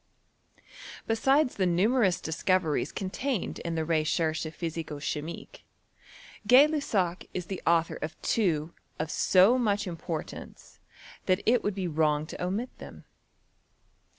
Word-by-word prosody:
Besides 265 +5 +2
the 190 -2 +2
numerous 190 +2 +2
discoveries 165 0 0
contained 210 +4 -3
in 170 -1 -4
the 160 -1 -1
Recherches 160 0 0
Physico 165 -3 -4
chimique, 150 +3 -6 0.8
Gay 255 +5 +8
Lussac 200 - -1
' - - -36
is 180 -2 -3
the 190 +1 -6
author 165 0 +2
of 155 0 -5
two 170 -7 0 0.2
of 155 +1 -3
so 195 +7 +4
much 205 -3 +1
importance 165 -2 -7 0.5
that 185 +1 +2
it 240 +1 +3
would 205 -2 -1
be 190 -2 -2
wrong 155 -2 +1
to 165 - -7
omit 205 +8 -3
them. - - -11
180 Hz, 125 wpm, -28 LUFS, 160-210 Hz, 0.8 s, Gay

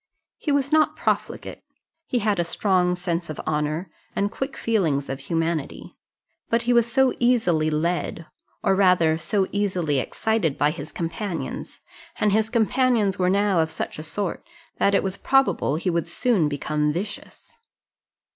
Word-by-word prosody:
He 300 - -1
was 280 0 +1
not 310 0 +3
profligate; - - -2 0.5
he 250 - 0
had 210 -4 +1
a - - +3
strong 180 0 +1
sense 175 -1 -3
of 155 - -6
honour, 155 +3 -1 0.2
and 200 +1 0
quick 270 +3 -4
feelings 165 -12 0
of 135 0 -3
humanity; 165 +1 -3 0.5
but 230 +1 +2
he 245 +1 +2
was 235 0 +3
so 265 +1 +3
easily 185 -11 +2
led, 165 +1 -1 0.4
or 195 - +3
rather 180 -5 +4
so 195 +4 +1
easily 185 -8 0
excited 190 - -1
by 145 +1 +3
his 170 - -8
companions, 170 +2 -5 0.4
and 210 - +3
his 220 +2 +2
companions 230 -3 +2
were 180 0 +3
now 200 -1 +2
of 160 0 +2
such 160 - -5
a - - -5
sort, 190 +4 -3 0.4
that 200 - +3
it - - +2
was 190 0 -3
probable 270 - +2
he 180 +3 -1
would 170 -1 -1
soon 215 - +1
become 150 +1 -1
vicious. 200 - -7
185 Hz, 155 wpm, -24 LUFS, 160-220 Hz, 0.5 s, rather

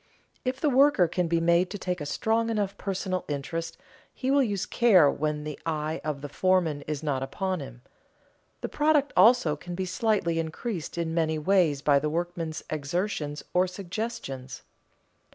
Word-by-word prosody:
If 255 +1 -2
the 300 - +1
worker 265 -8 +5
can 180 +1 -1
be 165 0 +1
made 170 +2 +3
to 205 - -5
take 180 -3 -3
a 145 - -4
strong 225 +8 0
enough 205 -3 -1
personal 185 -2 -3
interest 150 +3 -4 0.3
he 260 0 -2
will 280 0 +5
use 205 -6 -1
care 185 -12 +5
when 150 0 -2
the 150 -1 -6
eye 155 0 -2
of 150 -2 -3
the 145 - -5
foreman 175 -3 +1
is 150 0 -3
not 140 -4 -1
upon 185 +7 -2
him. 130 -3 -10 0.8
The - - -3
product 295 -1 +2
also 225 -10 +5
can 175 +4 -7
be 190 +1 -2
slightly 185 -4 0
increased 165 +2 -4
in 165 -1 -1
many 160 -1 +1
ways 155 -4 +2
by 145 -2 +5
the 150 +2 -1
workmen's 165 -1 -3
exertions 150 0 -2
or 180 +1 +3
suggestions. 180 - -6
170 Hz, 170 wpm, -27 LUFS, 150-200 Hz, 0.8 s, worker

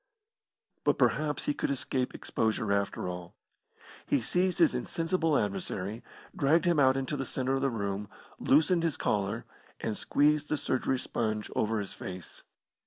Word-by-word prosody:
But - - +3
perhaps 150 -2 +1
he 145 - +1
could - - -2
escape 130 -1 -1
exposure 110 -1 0
after 100 -2 -1
all. 90 -1 -6 0.7
He 140 - +3
seized 180 +9 +1
his 165 -5 +5
insensible 165 +5 0
adversary, 100 +1 -2 0.3
dragged 155 +5 +3
him 170 -3 +3
out 130 -1 +5
into 135 +2 -2
the 135 - -2
centre 130 0 -1
of - - -2
he 135 - +2
room, 100 -3 -3 0.3
loosened 160 +5 +4
his 165 -5 0
collar, 105 +2 -1 0.3
and 110 - -2
squeezed 150 +4 +2
the 155 - +1
surgery 130 -1 0
sponge 110 -4 -2
over 110 0 +1
his 100 -2 -5
face. 90 -1 -8
130 Hz, 155 wpm, -30 LUFS, 105-150 Hz, 0.7 s, his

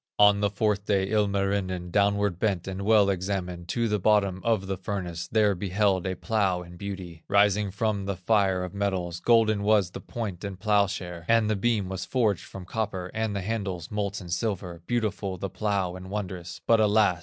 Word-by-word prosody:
On 105 0 +6
the 100 0 +2
fourth 105 0 0
day, 95 -2 +1
Ilmarinen 100 -4 0
Downward 100 -2 +2
bent 95 -5 0
and 95 0 -4
well 105 0 +5
examined, 90 -2 -3
To 115 +3 0
the 105 -1 0
bottom 100 -2 +2
of 110 -4 +1
the 95 0 -2
furnace; 90 -3 -4
There 105 0 +3
beheld 95 0 +1
a 95 - -2
plow 95 -3 0
in 85 0 -12
beauty 90 -4 -7
Rising 100 0 +3
from 100 0 -1
the 100 0 -2
fire 95 -1 +2
of 90 - -6
metals, 95 -4 -2
Golden 110 0 +3
was 100 -3 +3
the - - -7
point 105 -6 -5
and 100 -2 -5
plowshare, 100 -4 0
And 115 -2 +3
the - - +2
beam 105 -1 +1
was 95 0 -4
forged 110 -8 +1
from 95 -2 -9
copper, 95 -3 -3
And 110 -2 -1
the 100 - -1
handles, 95 -5 -3
molten 100 -3 -3
silver, 90 -3 -3
Beautiful 105 -5 -1
the 95 +1 -4
plow 95 -2 -1
and 95 0 -9
wondrous; 95 -4 -5
But 115 -1 +4
alas! 105 -4 +3
100 Hz, 185 wpm, -27 LUFS, 90-105 Hz, -, On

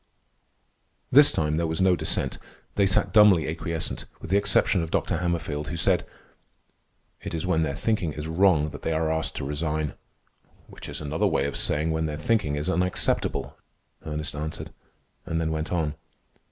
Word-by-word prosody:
This - - +8
time 75 -1 0
there 85 0 0
was 80 0 -2
no 95 -1 +4
dissent. 80 -1 -2 0.3
They 100 -1 +3
sat 95 - +1
dumbly 105 -7 +6
acquiescent, 80 +1 -3
with 80 - -8
the - - +4
exception 100 -2 +3
of 80 - -4
Dr. - - 0
Hammerfield, 80 -4 -2
who 85 - -4
said: - - +2 1.1
"It - - -5
is 80 - -3
when 80 -3 +2
their 75 -3 -1
thinking 105 -6 0
is 75 +1 -5
wrong 80 -3 +3
that - - -9
they 80 - -1
are 80 0 0
asked 80 0 -2
to - - -4
resign." 75 +1 -2 0.7
"Which - - -11
is - - -6
another 75 +1 0
way 70 - +1
of 70 - -3
saying 75 +2 +1
when 80 0 0
their 75 -1 -4
thinking 80 -3 0
is 75 +3 -3
unacceptable," 90 0 0 0.5
Ernest 75 -1 -4
answered, 75 +1 -5 0.6
and 80 - -1
then 80 -1 -1
went 80 0 -3
on. 80 -4 0
80 Hz, 175 wpm, -26 LUFS, 75-90 Hz, 1.1 s, This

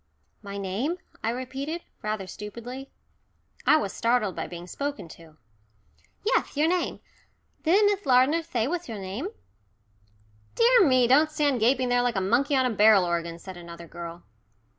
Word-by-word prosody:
"My 200 0 -7
name," 205 - -2 0.3
I 220 - +1
repeated, 265 +7 -4 0.2
rather 215 -2 -3
stupidly. 235 +8 -8 0.8
I 310 - +7
was 200 -10 -2
startled 230 -5 +1
by - - -4
being 175 0 -8
spoken 280 +2 -5
to. 160 -1 -15 0.9
"Yes, 440 - +1
your 305 +2 +3
name. 360 +1 -1 0.6
Didn't 385 +6 +4
Miss 410 -1 +1
Lardner 260 +6 +4
say 250 -8 -2
what's 350 -1 -3
your 225 - -5
name? 200 - -4 1.3
Dear 465 -5 +5
me 255 -2 +4
don't 295 +5 +5
stand 295 -4 +1
gaping 250 +3 +2
there 245 0 +3
like 245 -2 0
a - - +2
monkey 240 +9 +2
on 260 -1 +3
a 250 - +1
barrel 210 -3 +5
organ," 170 -1 -2
said 185 +1 -10
another 170 -1 -10
girl. 170 +1 -8
245 Hz, 160 wpm, -26 LUFS, 195-290 Hz, 1.3 s, I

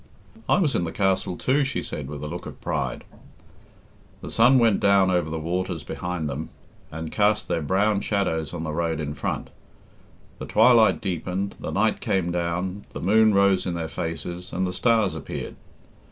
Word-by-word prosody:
"I - - +5
was 155 -8 +2
in - - +1
the 80 - -3
castle, 95 -2 0
too," 140 +3 +2
she 140 - -2
said, 75 -3 -5
with 75 -1 -7
a - - -3
look 85 +3 -6
of - - -10
pride. - - -3 1.2
The - - -7
sun 125 +4 +5
went 115 -5 +4
down 100 -1 +4
over 90 -4 +1
the 80 - -3
waters 85 0 -3
behind 90 0 -4
them, 75 +3 -4 0.4
and 80 0 -6
cast 105 0 +2
their 80 - -1
brown 100 +6 +1
shadows 80 -8 -1
on 85 -2 -5
the 80 -1 -3
road 80 -1 -1
in 75 -1 -3
front; - - -4 0.9
the - - -6
twilight 115 0 +5
deepened, 95 0 -3
the - - -5
night - - +1
came 90 -2 0
down, 90 +3 -2
the - - -5
moon 110 +3 +4
rose 100 -2 +3
in 90 - -2
their 80 -1 -3
faces, 85 +3 -5
and 95 +2 -1
the 90 - -3
stars 110 -6 +2
appeared. 80 -4 -6
90 Hz, 180 wpm, -24 LUFS, 80-100 Hz, 1.2 s, I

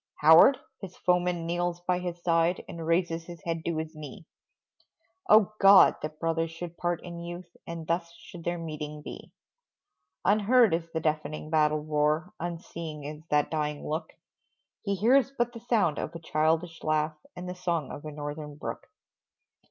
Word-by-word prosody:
"Howard?" 160 - +8 0.2
His 185 -2 -9
foeman 180 -1 +1
kneels 175 0 -1
by 180 0 0
his 175 -1 -5
side, 170 +1 +2
And 165 -1 -7
raises 165 -1 +1
his 170 -2 -11
head 165 -1 -3
to 170 -2 -1
his 160 0 -4
knee 155 +4 -9 1.0
Oh, 215 -1 +6
God! 195 0 +8
that 155 0 -6
brothers 165 0 0
should 165 +1 -8
part 175 -1 -2
in 170 -1 -7
youth, 175 0 -8
And 165 -1 -6
thus 170 +1 -1
should 170 0 -12
their 175 +1 -1
meeting 150 -2 -6
be. - - -9 0.9
Unheard 215 +1 +4
is 165 0 -1
the 160 - -1
deafening 155 0 -2
battle 155 -1 +3
roar, 155 +4 0
Unseen 165 -2 -6
is 150 +2 -7
that 150 -1 +2
dying 150 -2 -2
look; 155 +2 -3 0.7
He 200 -2 -1
hears 255 +7 +4
but 240 0 0
the 230 - -8
sound 220 -9 +1
of 170 - -5
a - - -5
childish 160 +1 0
laugh, 155 0 +1 0.2
And 180 0 -7
the 180 - -4
song 170 -5 -2
of - - -8
a 155 - -6
Northern 150 0 -6
brook. 150 - -6
165 Hz, 165 wpm, -28 LUFS, 155-180 Hz, 1.0 s, Howard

